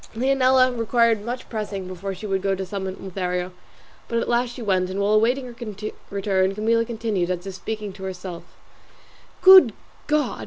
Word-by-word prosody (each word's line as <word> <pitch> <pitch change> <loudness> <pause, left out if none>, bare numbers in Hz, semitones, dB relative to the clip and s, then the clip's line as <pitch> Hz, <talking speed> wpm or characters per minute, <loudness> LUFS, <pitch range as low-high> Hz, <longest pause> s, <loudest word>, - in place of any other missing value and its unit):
Leonela 255 0 +3
required 230 -2 +2
much 245 +3 -5
pressing 210 -4 -4
before 185 +1 -5
she 215 - -9
would 195 -2 -1
go 195 0 0
to 190 0 -4
summon 190 0 -5
Lothario, 180 -1 -3 0.6
but 235 - -2
at 230 - -1
last 240 0 0
she 250 - -8
went, 185 -3 +1
and 190 +1 -4
while 200 +1 +2
awaiting 240 +5 +2
her 245 -1 -10 0.5
return 195 -1 0
Camilla 230 +2 +2
continued, 220 -6 -2
as 180 0 -3
if 195 - -6
speaking 210 +1 -5
to 190 - -11
herself, 180 -2 -6 1.0
"Good 375 - +9 0.3
God! 300 -3 0
210 Hz, 170 wpm, -23 LUFS, 190-235 Hz, 1.0 s, Good